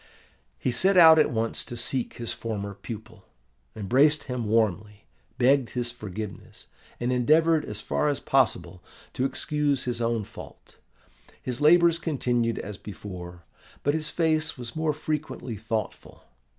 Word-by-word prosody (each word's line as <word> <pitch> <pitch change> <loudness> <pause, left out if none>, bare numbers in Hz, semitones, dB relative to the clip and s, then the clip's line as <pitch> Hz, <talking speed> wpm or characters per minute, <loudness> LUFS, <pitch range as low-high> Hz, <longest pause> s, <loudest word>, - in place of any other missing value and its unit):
"He 95 - -1
set 185 +11 +3
out 160 -2 +9
at 155 - +4
once 115 -1 -2
to 120 - -8
seek 125 +1 -2
his 120 -1 -3
former 100 -3 -4
pupil, 110 0 -10 0.5
embraced 135 +9 +3
him 125 -3 -4
warmly, 105 -1 0 0.3
begged 130 0 +3
his 120 -1 -3
forgiveness, 105 -3 -8 0.3
and 120 +1 -1
endeavoured 155 +5 +3
as 105 0 -6
far 150 - 0
as 145 -2 0
possible 125 -8 0 0.3
to 130 - 0
excuse 145 -1 0
his 120 -1 -2
own 115 -1 0
fault. - - -13 0.6
His 125 +2 -5
labours 170 +2 +5
continued 120 -7 0
as 105 0 -6
before; 90 -4 -9 0.4
but 145 - +2
his 155 -1 -1
face 155 -2 0
was 120 -2 -7
more 160 -1 +1
frequently 150 -5 -4
thoughtful. 110 +1 -5
120 Hz, 140 wpm, -26 LUFS, 110-150 Hz, 0.6 s, out